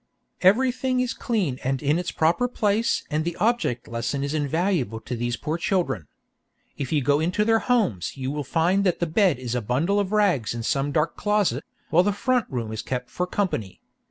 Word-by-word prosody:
"Everything 255 +6 +3
is 250 -1 0
clean 185 - -1
and 135 +1 0
in 150 +4 +2
its 180 - -3
proper 170 +10 +2
place 220 -2 +1
and 155 +1 +1
the 170 +1 -3
object 215 - 0
lesson 120 +4 -2
is 140 +1 -2
invaluable 155 - 0
to 125 - -5
these 120 0 -2
poor 155 +7 -3
children. 170 - -1 0.7
If 135 -3 -4
you 150 -3 +2
go 145 +2 +3
into 180 +6 +1
their 225 0 +4
homes 200 - 0
you 130 0 -3
will 150 0 -3
find 170 +8 +2
that 180 -3 +1
the 175 - +1
bed 175 - +2
is 125 -2 -4
a 125 - 0
bundle 145 - +1
of 200 -1 -1
rags 185 - +2
in 115 - -4
some 140 +3 0
dark 150 +1 0
closet, 205 - +1 0.3
while 170 - +6
the 205 +2 +1
front 250 +4 +1
room 115 -4 -3
is 110 - -4
kept 125 -1 -4
for 180 - -2
company. 175 - -2
160 Hz, 200 wpm, -24 LUFS, 130-205 Hz, 0.7 s, while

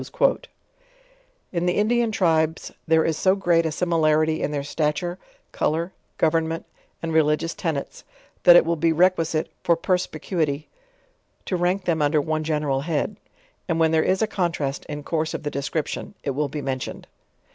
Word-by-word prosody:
In 175 -1 -1
the 180 - +1
Indian 230 +2 +2
tribes 160 -5 +1 0.2
there 160 0 +4
is 160 - +1
so 185 +4 +3
great 170 -4 +2
a - - -2
similarity 155 -1 +2
in - - 0
their 145 -1 -2
stature, 155 +5 -2 0.3
color, 165 +4 -1 0.2
government, 165 0 +1 0.4
and 165 -1 -2
religious 160 +1 +2
tenets, 155 -5 -4 0.4
that 175 - +8
it 175 - +7
will 170 +1 +1
bo 165 +2 +2
requisite, 165 -1 +2
for 170 - +3
sperspicuity, 160 -4 -1 0.8
to 185 - -1
rank 180 +2 0
them 165 -3 +1
under 150 +1 +3
one 155 +1 -1
gen 155 -1 -1
eral 135 -2 0
head. 165 +6 -1 0.5
And; 165 -2 0
when 160 -1 +4
there 160 -1 +4
is 190 +5 +1
a - - +4
contrast 165 -9 -2
in 150 -1 -6
course 160 0 -1
of - - -5
the 145 - -3
description, 145 +7 -3
it 140 - -1
will 145 +2 -1
be 150 - -5
mentioned. 130 -1 -4
160 Hz, 165 wpm, -24 LUFS, 150-175 Hz, 0.8 s, that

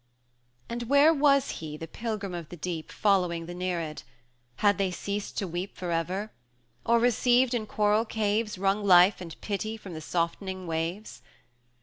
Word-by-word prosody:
V. - - -43 0.6
And 235 +1 -3
where 285 +3 +6
was 280 -2 +3
he 155 -1 -6
the 165 - -7
Pilgrim 215 -1 -4
of 170 -3 -6
the 175 - -9
Deep, 165 -1 -5
Following 180 -5 +1
the 175 - -7
Nereid? 175 -4 -3 0.5
Had 205 - +2
they 195 -1 +2
ceased 200 +3 -4
to 195 - -1
weep 175 +3 -5
For 180 -2 -4
ever? 180 +6 -2 0.5
or, 235 - +3
received 245 +1 +3
in 220 -3 -2
coral 210 +2 +2
caves, 215 -1 -1
Wrung 195 +2 +1
life 185 0 +6
and 165 -3 -9
pity 215 +2 -3
from 195 -4 -10
the 160 - -6
softening 180 +3 -2
waves? 165 +5 -4
195 Hz, 165 wpm, -28 LUFS, 175-220 Hz, 0.6 s, where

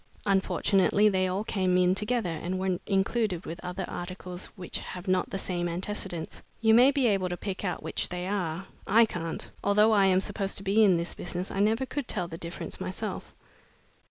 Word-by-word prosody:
"Unfortunately, 200 +1 +3
they 185 -2 +1
all 190 +3 -1
came 185 -4 +1
in 180 0 +4
together 210 -1 0
and 175 +3 -3
were 185 -1 0
included 195 -1 0
with 170 - -7
other 180 +1 -4
articles 180 0 -6
which 185 -4 -5
have 180 +1 -8
not 185 -1 +1
the - - -3
same 175 -2 -2
antecedents. 180 -1 -4 0.2
You 220 -1 +4
may 245 +4 +7
be 280 -2 +1
able 195 -5 +2
to 175 - -3
pick 195 0 -4
out 180 - -2
which - - -2
they 180 0 -4
are. 185 -3 -2 0.2
I 225 +3 +6
can't. 165 -6 -5
Although 210 +2 +4
I 200 -3 +5
am 185 -1 +4
supposed 195 0 -3
to 195 - -2
be 200 +3 +4
in 190 -4 +5
the 170 +1 -2
business, 180 +1 -4
I 195 - -3
never 220 +5 +2
could 260 +1 -4
tell 180 -5 -1
the 165 -1 -8
difference 170 +1 -4
myself." - - -5
190 Hz, 195 wpm, -28 LUFS, 180-205 Hz, 0.2 s, may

